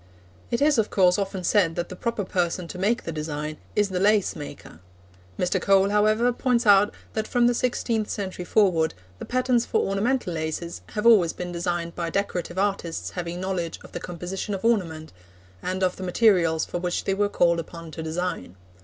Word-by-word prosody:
It 235 +4 +1
is, 295 -4 +4
of 220 - +1
course, 180 -1 +3
often 195 -2 -3
said 175 -3 +2
that 175 0 -3
the 185 - -7
proper 230 +1 -2
person 180 -1 -1
to 180 - -7
make 220 +6 +1
the 165 - -4
design 155 -1 -4 0.2
is 205 -1 +2
the 185 -1 -2
lace 205 0 +3
maker. 145 - -9 0.6
Mr. 180 +1 0
Cole, 195 +1 +4
however, 215 +4 +3
points 245 -1 +1
out 205 0 +6 0.2
that 220 0 -2
from 245 -1 +2
the 245 - +4
sixteenth 235 -3 -1
century 190 -3 -4
forward 175 - +2 0.2
the - - -6
patterns 250 -1 +1
for - - +1
ornamental 200 0 0
laces 160 +2 -4
have 210 +1 -2
always 200 -8 +6
been 180 0 -5
designed 175 -1 -2
by 170 -1 -3
decorative 185 -2 -2
artists 195 -4 -1
having 175 -1 -4
knowledge 185 -3 -3
of - - -13
the - - -5
composition 180 +4 -4
of 190 - -6
ornament, 165 -9 0 0.5
and 185 +1 -2
of 185 -1 +1
the 190 - -6
materials 180 -5 +3
for 175 - -4
which 175 0 -2
they 195 - 0
were 205 +1 +1
called 170 -3 +2
upon 165 0 -8
to 160 - -6
design. 160 - -3
185 Hz, 190 wpm, -25 LUFS, 170-210 Hz, 0.6 s, out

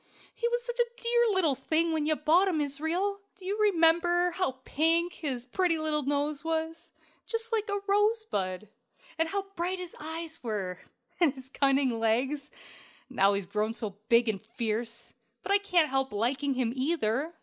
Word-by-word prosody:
"He 470 - -1
was 480 0 -1
such 485 0 -5
a 480 - +5 0.2
dear 475 0 +3
little 365 -7 +3
thing 315 +5 +1
when 310 -2 0
you 310 - +3
bought 325 +6 +4
him, 345 -5 +1
Israel! 320 +8 -1 0.2
Do 380 - -13
you 395 +2 -1
remember 350 -2 +4
how 340 -8 -1
pink 335 +3 +1
his 260 -6 -4
pretty 340 +5 +1
little 310 -1 +1
nose 290 +1 -1
was 325 +1 -3 0.4
just 455 0 -2
like 435 -2 0
a 405 - 0
rosebud 400 - 0 0.5
and 325 0 +2
how 395 +1 -1
bright 360 +2 -1
his 360 -2 -8
eyes 320 +1 -6
were, 195 -6 -3 0.4
and 315 -6 +3
his 260 -1 -12
cunning 270 -3 +2
legs? 260 +6 0 0.6
And 260 - -12
now 195 +1 +5
he's 200 -1 -2
grown 215 +4 -1
so 215 -3 -3 0.2
big 235 0 +5
and 210 -3 -1
fierce! 230 0 -4 0.3
But - - -3
I 400 - +5
can't 355 -6 +2
help 270 0 0
liking 265 +6 0
him, 245 -2 0
either." 280 +1 0
310 Hz, 175 wpm, -29 LUFS, 255-360 Hz, 0.6 s, a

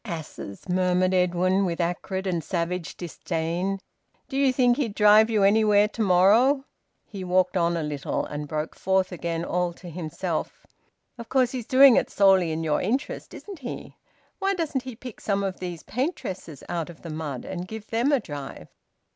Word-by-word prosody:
"Asses!" 160 - -7
murmured 185 0 +2
Edwin, 185 +1 +2
with 175 -2 -2
acrid 180 +2 -2
and 175 -4 -1
savage 175 0 -3
disdain. 175 +2 -2 0.5
"Do 270 - -6
you 275 -1 +3
think 250 -1 +3
he'd 230 -8 -2
drive 210 +1 +6
you 215 -3 +2
anywhere 210 0 +5
to 225 - -5
morrow?" 220 +9 +4 0.4
He 195 -3 -7
walked 185 +1 +2
on 170 -1 +2
a 165 - -2
little, 145 -2 -2
and 150 0 -5
broke 155 +1 -3
forth 190 0 0
again, 170 -1 -3
all 180 -1 -1
to 175 0 -11
himself: 165 +1 -4 0.5
"Of 235 - -8
course 255 -2 +2
he's 250 -4 -5
doing 265 -1 +7
it - - +1
solely 190 -4 +4
in 160 +1 -2
your 150 -2 +1
interest, 245 +9 -3
isn't 395 -5 -9
he? 250 -3 -7 0.4
Why 390 0 +1
doesn't 315 -6 -1
he 255 -3 -6
pick 250 0 -10
some 200 -1 0
of 190 -2 -3
these 175 -3 -6
paintresses 225 - -4
out 170 -1 -3
of 170 - -13
the 165 - -6
mud 155 -5 -5
and 180 0 -5
give 220 0 -7
them 235 +5 +2
a 285 - +4
drive?" 145 - -8
185 Hz, 180 wpm, -25 LUFS, 170-225 Hz, 0.5 s, doing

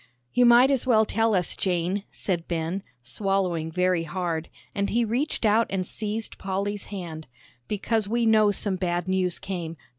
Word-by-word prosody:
"You 245 0 +5
might 245 +3 +7
as 265 -2 +1
well 220 -3 +5
tell 225 0 +1
us, 180 -2 0
Jane," 180 +1 0
said 175 -4 -3
Ben, 170 +3 -2 0.2
swallowing 175 - -1
very 180 0 +2
hard, 165 -1 -3 0.2
and 200 0 -1
he 235 +1 +2
reached 240 +3 -1
out 220 +2 +4
and 190 -1 -1
seized 215 +3 -4
Polly's 200 +1 -2
hand, 170 -6 -7 0.4
"because 215 +1 0
we 235 +2 +1
know 215 -1 +5
some 200 -1 -1
bad 175 -1 -1
news 185 -1 0
came. 170 -4 -5
195 Hz, 160 wpm, -26 LUFS, 175-220 Hz, 0.4 s, might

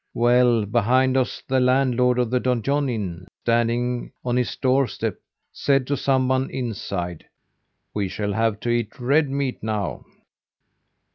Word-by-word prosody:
Well, 120 -2 +4
behind 125 +4 +2
us 130 -2 -1
the 130 0 +2
landlord 125 -1 +3
of 120 -2 0
the 125 - +2
Donjon 130 +3 0
Inn, 90 -7 -4 0.2
standing 120 +1 0
on 120 -1 0
his 125 -1 0
doorstep, 130 0 0 0.3
said 135 -2 +1
to 145 - 0
someone 130 -1 +1
inside: 100 -8 -4 0.7
'We 100 -2 -1
shall 105 +2 -3
have 110 0 0
to 120 - -2
eat 120 +1 -1
red 140 +4 +2
meat 135 -2 -2
now. 105 -9 -3
125 Hz, 135 wpm, -23 LUFS, 110-130 Hz, 0.7 s, Well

